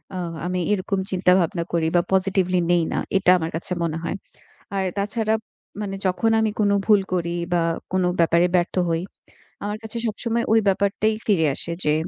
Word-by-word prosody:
আ - - -3 0.3
আমি 180 0 -1
এরকম 195 -1 0
চিন্তাভাবনা 180 -2 +2
করি 165 -1 +2
বা 175 - +5
positively 185 -1 +2
নেই 175 -1 +4
না, - - 0 0.2
এটা 185 -1 +4
আমার 160 -1 -3
কাছে 170 - -5
মনে 165 -1 -1
হয়। 170 - -2 0.6
আর 190 - 0
তাছাড়া 215 +2 0 0.5
মানে 200 -2 -3
যখন 225 +5 +1
আমি 220 -1 +2
কোনো 200 -1 +3
ভুল 210 -2 +6
করি 170 -1 0 0.2
বা 175 -1 +3 0.3
কোনো 185 -1 +2
ব্যাপারে 170 +1 +4
ব্যর্থ 175 0 0 0.2
হই, 165 0 0 0.6
আমার 210 +1 -3
কাছে 220 +1 -6
সবসময় 230 +2 -1
ওই 225 - +6
ব্যাপারটাই 200 +2 +2
ফিরে 185 -7 +3
আসে 170 - -6
যে, 150 - +3
185 Hz, 175 wpm, -23 LUFS, 175-205 Hz, 0.6 s, ভুল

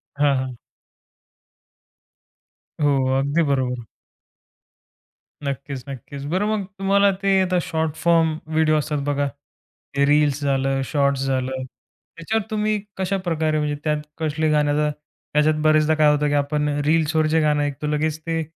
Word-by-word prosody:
हां, 145 -2 +2
हां. 130 -1 -3 2.3
हो. 135 -2 +2
अगदी 145 +5 +1
बरोबर. 125 -3 -1 1.6
नक्कीच, 140 -1 -4
नक्कीच. 135 +2 -8
बरं 190 +3 +1
मग 210 -3 -1
तुम्हाला 200 +1 +4
ते 195 -1 +3
आता 185 -1 +1
शॉर्ट 160 -1 -2
फॉर्म 165 -2 +2 0.2
व्हिडिओ 155 -1 +3
असतात 150 0 -1
बघा. 145 0 0 0.7
ते 140 0 +3
रील्स 145 -1 +3
झालं, 135 -1 0
शॉर्ट्स 140 -1 +1
झालं. 130 0 -1 0.5
त्याच्यावर 215 +6 -1
तुम्ही 215 0 0 0.2
कशाप्रकारे 175 -5 0
म्हणजे 150 -1 -1
त्यात 150 -1 0 0.2
कसले 155 0 0
गाण्याचा 150 0 +2 0.4
त्याच्यात 150 +1 +3
बरेचदा 155 0 +4
काय 150 -1 +5
होतं 150 0 +1
की 145 - 0
आपण 150 +1 0 0.2
रील्सवर 160 0 +2
जे 160 - +4
गाणं 150 -1 +2
ऐकतो 145 +1 -3
लगेच 150 +1 -1
ते 165 -1 -1
150 Hz, 135 wpm, -22 LUFS, 140-160 Hz, 2.3 s, काय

